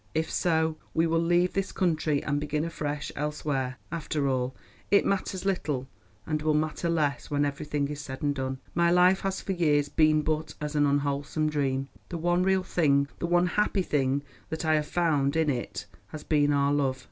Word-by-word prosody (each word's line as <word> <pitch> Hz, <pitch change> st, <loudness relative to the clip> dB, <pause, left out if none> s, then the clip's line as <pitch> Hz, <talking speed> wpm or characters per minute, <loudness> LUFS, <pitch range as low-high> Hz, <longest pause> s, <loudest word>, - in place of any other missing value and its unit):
If 160 Hz, 0 st, 0 dB
so, 160 Hz, -2 st, +1 dB, 0.2 s
we 165 Hz, -, +3 dB
will 165 Hz, 0 st, +2 dB
leave 175 Hz, +2 st, +2 dB
this 195 Hz, 0 st, -1 dB
country 155 Hz, -5 st, 0 dB
and 145 Hz, 0 st, 0 dB
begin 150 Hz, +1 st, -1 dB
afresh 150 Hz, -3 st, -4 dB
elsewhere. 140 Hz, -3 st, -2 dB
After 155 Hz, -3 st, -1 dB
all, 130 Hz, -1 st, -1 dB, 0.3 s
it 200 Hz, -, +4 dB
matters 190 Hz, -1 st, -1 dB
little, 150 Hz, -9 st, -1 dB, 0.4 s
and 155 Hz, -1 st, -1 dB
will 155 Hz, 0 st, +2 dB
matter 155 Hz, +2 st, -1 dB
less 150 Hz, -6 st, 0 dB
when 145 Hz, 0 st, +1 dB
everything 145 Hz, 0 st, -2 dB
is 150 Hz, 0 st, -5 dB
said 130 Hz, -1 st, -7 dB
and 145 Hz, -1 st, +2 dB
done. 130 Hz, -1 st, -3 dB, 0.2 s
My 170 Hz, 0 st, +3 dB
life 180 Hz, +2 st, +5 dB
has 195 Hz, -1 st, -2 dB
for -, -, -3 dB
years 150 Hz, -5 st, +2 dB
been 155 Hz, 0 st, +3 dB
but 155 Hz, 0 st, -2 dB
as 150 Hz, 0 st, -4 dB
an 145 Hz, -1 st, +4 dB
unwholesome 145 Hz, +2 st, 0 dB
dream. 135 Hz, -2 st, 0 dB, 0.2 s
The 170 Hz, -, -4 dB
one 175 Hz, +2 st, +1 dB
real 190 Hz, 0 st, +2 dB
thing, 140 Hz, -6 st, +2 dB
the 170 Hz, -, -1 dB
one 175 Hz, +1 st, +3 dB
happy 195 Hz, +1 st, +1 dB
thing 140 Hz, -3 st, 0 dB, 0.3 s
that 160 Hz, +1 st, -4 dB
I 155 Hz, -, +3 dB
have 150 Hz, -1 st, +1 dB
found 150 Hz, -5 st, +1 dB
in 160 Hz, -2 st, +2 dB
it 125 Hz, -3 st, -4 dB, 0.2 s
has 155 Hz, -, -8 dB
been 145 Hz, -2 st, +2 dB
our 140 Hz, 0 st, +2 dB
love. 135 Hz, -2 st, 0 dB
150 Hz, 195 wpm, -28 LUFS, 145-170 Hz, 0.4 s, life